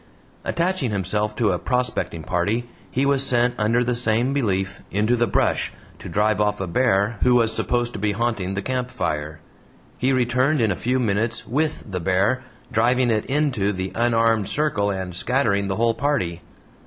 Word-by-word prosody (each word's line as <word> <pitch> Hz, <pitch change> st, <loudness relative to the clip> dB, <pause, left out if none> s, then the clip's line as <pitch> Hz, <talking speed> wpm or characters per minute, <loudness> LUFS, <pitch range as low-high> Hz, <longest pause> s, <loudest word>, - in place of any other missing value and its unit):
Attaching 170 Hz, -6 st, 0 dB
himself 105 Hz, +1 st, -1 dB
to 110 Hz, -3 st, +2 dB
a 90 Hz, -, -1 dB
prospecting 125 Hz, -10 st, -1 dB
party, 105 Hz, +9 st, -1 dB, 0.2 s
he 135 Hz, +2 st, 0 dB
was 140 Hz, -1 st, +3 dB
sent 120 Hz, -2 st, +3 dB
under 115 Hz, +3 st, +2 dB
the 125 Hz, 0 st, 0 dB
same 120 Hz, +2 st, +1 dB
belief, 95 Hz, -7 st, -1 dB
"into 105 Hz, +4 st, +1 dB
the 120 Hz, 0 st, +1 dB
brush" -, -, +1 dB, 0.3 s
to -, -, -8 dB
drive 105 Hz, 0 st, +1 dB
off 105 Hz, 0 st, +1 dB
a 95 Hz, -, -2 dB
bear, 105 Hz, +2 st, +1 dB
who 125 Hz, -1 st, +4 dB
was 115 Hz, -2 st, +3 dB
supposed 120 Hz, -1 st, 0 dB
to -, -, -5 dB
be 105 Hz, +1 st, +1 dB
haunting 105 Hz, -4 st, -1 dB
the 100 Hz, -, -3 dB
campfire. 80 Hz, -, -3 dB, 0.6 s
He 130 Hz, +2 st, +2 dB
returned 130 Hz, +3 st, +2 dB
in 110 Hz, -4 st, +2 dB
a -, -, 0 dB
few 125 Hz, +6 st, 0 dB
minutes 110 Hz, -1 st, -1 dB
WITH 150 Hz, +6 st, -1 dB
the 90 Hz, -, -2 dB
bear, 95 Hz, +9 st, +1 dB, 0.3 s
DRIVING 120 Hz, +2 st, +2 dB
IT 110 Hz, -1 st, 0 dB
INTO 135 Hz, -8 st, +1 dB
the 95 Hz, 0 st, -4 dB
unarmed 115 Hz, -3 st, +2 dB
circle 135 Hz, -9 st, 0 dB
and 95 Hz, -3 st, -4 dB
scattering 100 Hz, -2 st, +1 dB
the 95 Hz, -, -1 dB
whole 115 Hz, +2 st, +2 dB
party. 115 Hz, -, -1 dB
115 Hz, 175 wpm, -22 LUFS, 100-125 Hz, 0.6 s, who